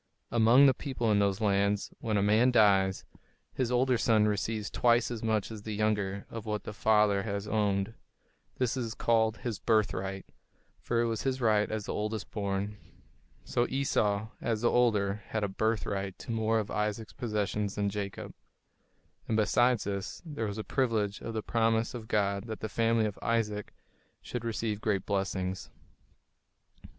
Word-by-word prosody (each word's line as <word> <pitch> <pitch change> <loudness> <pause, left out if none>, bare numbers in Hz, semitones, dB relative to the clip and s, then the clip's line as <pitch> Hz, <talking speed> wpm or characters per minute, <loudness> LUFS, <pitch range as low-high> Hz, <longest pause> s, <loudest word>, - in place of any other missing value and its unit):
Among 120 +4 +6
the 135 - +6
people 125 -6 -2
in 105 - +4
those 100 +1 +1
lands, 100 0 +1
when 110 -2 -1
a 100 - +2
man 110 +5 +4
dies, 100 -5 +3 0.5
his 125 -2 -1
older 125 0 +2
son 110 -3 +4
receives 105 +1 -2
twice 120 0 +3
as 115 -2 -4
much 110 -1 0
as 110 -2 -7
the 105 0 -5
younger 100 -2 0
of 115 -1 -7
what 105 -1 -2
the 105 - -6
father 105 -2 +3
has 100 -1 -4
owned. 105 -1 0 0.6
This 125 -1 0
was 120 -3 -3
called 110 -1 +2
his 115 -6 -4
"birthright," 100 -3 0 0.5
for 115 -1 0
it - - +2
was 115 -2 -1
his 130 -1 -1
right 110 -3 +2
as 110 -2 -3
the - - -3
oldest 105 0 -3
born. 100 0 -2 0.7
So 120 - 0
Esau, 110 -6 0
as 110 -2 -1
the 120 - +3
older, 105 -4 +2
had 110 -1 -2
a - - +1
"birthright" 100 -2 -2
to - - -7
more 110 0 +1
of 105 -2 -2
Isaac's 105 +1 -2
possessions 105 -3 -2
than 100 -1 0
Jacob. 100 -1 -5 0.9
And 110 - +1
besides 120 +2 +3
this, 100 -1 -4
there 145 -9 -3
was 100 0 -5
the 110 - -3
privilege 110 -7 0
of 115 - -5
the 110 - -2
promise 115 0 +1
of 115 -3 -7
God 100 -1 0
that 110 -1 -6
the 110 - -3
family 115 0 +2
of 105 -2 -4
Isaac 105 -3 -1 0.5
should 120 -2 -6
receive 110 -2 -2
great 100 -4 0
blessings. 95 -2 -2
110 Hz, 170 wpm, -30 LUFS, 100-115 Hz, 0.9 s, Among